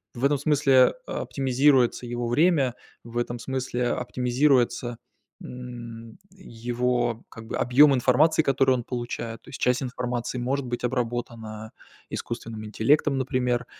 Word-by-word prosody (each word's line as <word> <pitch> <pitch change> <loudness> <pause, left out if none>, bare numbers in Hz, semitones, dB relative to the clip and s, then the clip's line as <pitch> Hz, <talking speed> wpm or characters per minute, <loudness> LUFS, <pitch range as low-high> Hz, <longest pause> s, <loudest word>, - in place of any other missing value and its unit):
В 120 - -7
этом 145 0 +3
смысле, 140 -3 +4
э, - - -7
оптимизируется 130 -2 +2
его 120 0 -3
время, 135 -1 +2 0.3
в 115 +1 -8
этом 120 0 -2
смысле 130 -1 -2
а - - -2
оптимизируется, 125 -1 +1 0.5
м, 120 -2 -9
его, 120 - -2
как 115 0 -11
бы, - - -3
объём 135 +3 +5
информации, 150 +6 +3
который 135 -1 +3
он 120 - -3
получает. 120 -2 -5
То - - -16
есть, - - -8
часть 125 +2 +2
информации 125 -1 -3
может 130 +3 -1
быть 120 0 -4
обработана 115 -3 -3 0.4
искусственным 115 -2 -5
интеллектом, 135 +7 +2
например, 125 -1 0
125 Hz, 135 wpm, -25 LUFS, 120-135 Hz, 0.5 s, объём